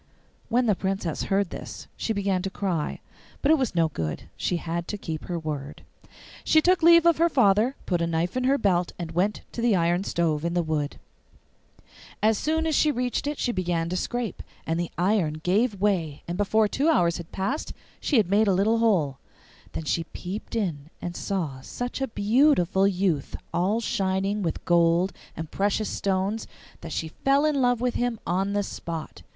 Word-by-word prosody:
When 245 +2 +2
the 215 - +4
Princess 190 -4 -2
heard 195 -2 +1
this - - -7
she - - -2
began 200 -3 0
to 195 - -3
cry, 185 -6 -2 0.4
but 285 - +4
it 320 - +5
was 255 -8 -1
no 165 -1 +4
good; 80 - -4
she 180 - -1
had 170 0 -3
to 210 - -3
keep 160 -5 -5
her 175 - -3
word. 150 -3 -5 0.6
She 315 - +5
took 360 +3 +3
leave 335 0 +7
of 340 -2 +4
her 335 +1 +4
father, 240 -1 +3
put 175 -3 0
a 170 - +1
knife 165 +4 -1
in 255 0 0
her 275 +2 +4
belt, 180 -7 +1
and 170 -2 -5
went 185 +5 0
to 235 - -5
the 230 -3 +3
iron 175 +1 +2
stove 165 -5 0
in 170 +1 -1
the 175 - +2
wood. 155 -2 -2 1.2
As 215 -1 +3
soon 320 +1 0
as 320 - +1
she 305 - +4
reached 250 0 -1
it 295 0 -2
she 245 - 0
began 175 -4 -1
to 180 - -2
scrape, 240 +1 -3 0.2
and 165 +1 -1
the 175 - -2
iron 180 -3 +2
gave 205 +3 +1
way 180 -8 0
and 175 - -3
before 210 +2 +2
two 280 +9 +1
hours 170 - +3
had 170 -1 -9
passed 225 +11 -2 0.3
she 285 - +1
had 210 -5 +4
made 205 +3 +3
a 195 - +4
little 220 +4 +2
hole. 170 -12 +2 0.5
Then - - -4
she 165 +2 -1
peeped 190 +8 -7
in 160 -9 -2
and 175 0 -5
saw 160 -10 -3
such 245 - -5
a 270 - +1
beautiful 205 - +3
youth 180 -7 0 0.2
all 195 +6 +1
shining 195 -1 0
with 165 -4 -3
gold 170 +2 +3 0.2
and 160 -1 -6
precious 205 +2 0
stones 195 +3 -1 0.3
that 165 - -8
she 160 - -3
fell 275 +2 +4
in 295 -3 +2
love 245 -2 +2
with 250 -1 +1
him 245 -2 -1
on 190 +3 0
the 205 0 +1
spot. 165 - -6
195 Hz, 195 wpm, -26 LUFS, 170-230 Hz, 1.2 s, leave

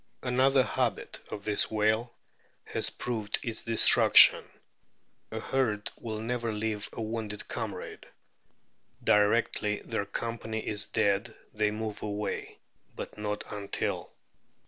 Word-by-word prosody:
Another 130 +1 +3
habit - - -2
of 100 - -6
this 105 -1 +1
whale 110 +2 0 0.5
has - - +2
proved 110 -4 -2
its 115 -2 -3
de 115 -1 -3
struction; - - +8 0.9
a - - -5
herd 110 -6 -1
will 110 -2 -6
never 115 0 -2
leave 105 -1 -3
a - - -8
wounded 110 -2 -4
comrade. - - -6 1.0
Directly 105 0 +2
their 100 - -2
companion 110 -1 -4
is 105 -1 -1
dead 105 +1 0 0.2
they 105 0 +1
move 110 0 -5
away, 105 0 -4 0.4
but - - -8
not 105 0 -3
until. 100 -1 -3
110 Hz, 120 wpm, -29 LUFS, 105-115 Hz, 1.0 s, struction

